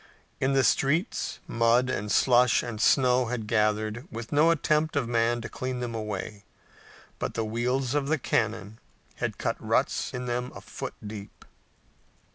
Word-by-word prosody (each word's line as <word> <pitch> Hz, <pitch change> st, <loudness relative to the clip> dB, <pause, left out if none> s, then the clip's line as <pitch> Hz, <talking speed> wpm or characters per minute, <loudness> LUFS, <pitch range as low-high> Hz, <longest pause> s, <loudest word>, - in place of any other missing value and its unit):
In 135 Hz, +1 st, +1 dB
the 135 Hz, -1 st, +4 dB
streets 155 Hz, -, +1 dB
mud 115 Hz, +2 st, +3 dB
and 105 Hz, -4 st, -2 dB
slush 125 Hz, -1 st, +4 dB
and 115 Hz, -3 st, -5 dB
snow 125 Hz, 0 st, +4 dB
had 115 Hz, -2 st, -3 dB
gathered, 110 Hz, +3 st, 0 dB
with 115 Hz, -1 st, -7 dB
no 150 Hz, +3 st, +5 dB
attempt 155 Hz, -1 st, +1 dB
of 140 Hz, -5 st, 0 dB
man 120 Hz, 0 st, +1 dB
to 110 Hz, -, -5 dB
clean 130 Hz, -1 st, -4 dB
them 120 Hz, -1 st, -4 dB
away, 105 Hz, -2 st, -5 dB, 0.8 s
but -, -, -3 dB
the 115 Hz, -, -1 dB
wheels 125 Hz, +4 st, -1 dB
of 145 Hz, -2 st, 0 dB
the 160 Hz, +2 st, +2 dB
cannon 110 Hz, -4 st, -1 dB, 0.4 s
had -, -, -3 dB
cut -, -, -3 dB
ruts -, -, 0 dB
in 125 Hz, 0 st, -5 dB
them 125 Hz, +1 st, -2 dB
a -, -, -8 dB
foot -, -, -7 dB
deep. 105 Hz, -1 st, -9 dB
120 Hz, 160 wpm, -27 LUFS, 110-130 Hz, 0.8 s, no